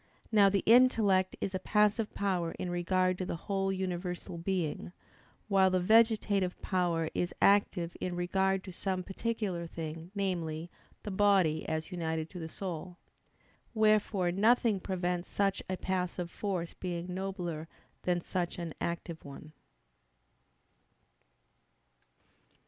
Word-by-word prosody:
Now 205 -3 +6
the 195 -1 +1
intellect 220 -6 +5
is 195 - -2
a 185 - -1
passive 210 +2 +2
power 180 -4 0
in 180 - -4
regard 185 +1 +1
to 185 - -1
the - - -2
whole 195 +2 -1
universal 180 -2 -3
being: 175 -1 -2 0.5
while 195 -2 +4
the 185 0 +2
vegetative 210 -2 +3
power 170 -4 0
is 175 - -2
active 190 -4 +3
in 180 -1 -2
regard 190 +2 +1
to 185 - -9
some 185 0 -2
particular 195 -4 -3
thing, 165 0 -6
namely, 170 -4 -2 0.3
the 210 - -4
body 190 -6 +3
as 160 +3 -3
united 160 -2 -2
to 180 - -7
the 160 -1 -5
soul. 175 0 -6 0.8
Wherefore 215 -4 +3
nothing 220 +2 +3
prevents 180 -1 -2
such 200 -1 0
a 185 - -1
passive 180 -2 -2
force 185 -5 -3
being 180 0 -4
nobler 180 -4 -4 0.3
than 175 -1 0
such 175 0 -3
an 170 -3 -5
active 170 -1 -4
one. 145 +2 -11
185 Hz, 125 wpm, -31 LUFS, 175-195 Hz, 0.8 s, Now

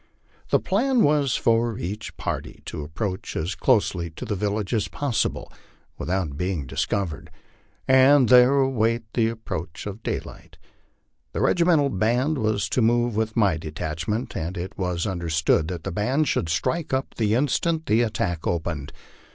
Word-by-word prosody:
The - - +4
plan 245 +5 +2
was 145 -3 +3
for 115 -1 +1
each 105 -3 -5
party - - -5
to - - -5
approach 95 +5 -4
as 85 +5 -2
closely 85 0 +1
to 80 - -8
the - - -2
village 105 +1 -2
as 110 -3 +1
possible 140 -6 -2 0.4
without 90 -6 -2
being 90 -4 -2
discovered, 85 +5 -2 0.6
and 130 0 +6
there 125 +2 +7
await 120 -4 +1
the 115 -2 +2
ap 115 -1 -8
proach 80 +1 -5
of 105 +2 -6
daylight. - - -6 0.8
The - - -2
regimental 170 -5 +3
band 125 +9 +1
was 110 -2 0
to 125 - +1
move 120 0 +2
with 110 +1 -1
my 100 -7 +3
detachment, 80 - -4
and 85 +4 -3
it 90 +3 -5
was 90 -2 -2
understood 85 -4 +1
that 90 -2 -5
the 95 - -3
band 130 - +1
should 85 - 0
strike 155 - -1
up 130 - -3
the 110 -1 +1
instant 155 +5 +1
the 110 +2 +3
attack 105 -8 -1
opened. 80 -4 -2
110 Hz, 155 wpm, -24 LUFS, 85-125 Hz, 0.8 s, there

